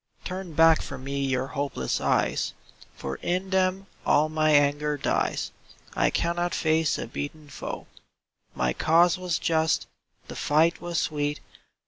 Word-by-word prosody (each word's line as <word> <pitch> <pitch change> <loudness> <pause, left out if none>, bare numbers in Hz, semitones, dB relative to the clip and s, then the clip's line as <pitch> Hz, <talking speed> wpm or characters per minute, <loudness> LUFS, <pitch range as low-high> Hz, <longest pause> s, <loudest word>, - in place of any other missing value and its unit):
Turn 185 -2 -5
back 165 +1 +6
from 135 -2 -7
me 140 0 -2
your 130 -1 0
hopeless 140 - -2
eyes, - - +1 0.4
For 65 - -5
in 185 +2 -2
them 190 0 +1 0.2
all 150 +2 +3
my 155 0 +1
anger 145 0 +3
dies: - - -1 0.4
I - - +3
cannot 175 +1 0
face 160 -1 +2
a - - -4
beaten 145 +5 -6
foe. 135 - -6 0.7
My 60 -1 +1
cause 170 - +4
was 180 -2 -1
just, 160 -1 +1 0.4
the - - -8
fight 160 +3 +2
was 175 -1 -3
sweet. 145 -1 -1
155 Hz, 140 wpm, -26 LUFS, 145-170 Hz, 0.7 s, back